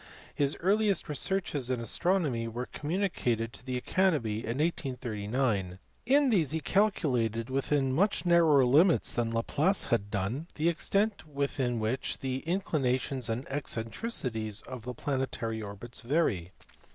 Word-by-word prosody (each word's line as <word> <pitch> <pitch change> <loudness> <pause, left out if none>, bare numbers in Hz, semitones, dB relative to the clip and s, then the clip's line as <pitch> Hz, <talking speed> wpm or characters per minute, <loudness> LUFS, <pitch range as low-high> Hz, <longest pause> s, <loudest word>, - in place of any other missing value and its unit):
His 140 0 +1
earliest 200 +1 +2
researches 150 -4 0
in 130 -2 0
astronomy 140 -2 +1
were 120 +2 -4
communicated 145 - -2
to - - -7
the 130 -1 -3
Academy 145 - +1
in 115 +2 -3
1839: 120 - -1 0.3
in 280 +1 +5
these 170 - +2
he 160 - -1
calculated 130 - +1
within 135 0 +1
much 195 +6 +1
narrower 165 -6 +5
limits 160 +8 +4
than 120 -1 0
Laplace 145 - +1
had 100 -4 +1
done 110 - -2
the 160 +3 +2
extent 200 +3 0
within 140 -4 -1
which 110 +4 -2
the 130 0 -3
incli 175 -4 0
nations 130 -1 0
and 115 +4 -3
eccentricities 115 - -2
of 125 -3 -9
the 125 0 -5
planetary 120 -5 -2
orbits 105 +3 -8
vary. 115 - 0
130 Hz, 135 wpm, -30 LUFS, 115-165 Hz, 0.3 s, in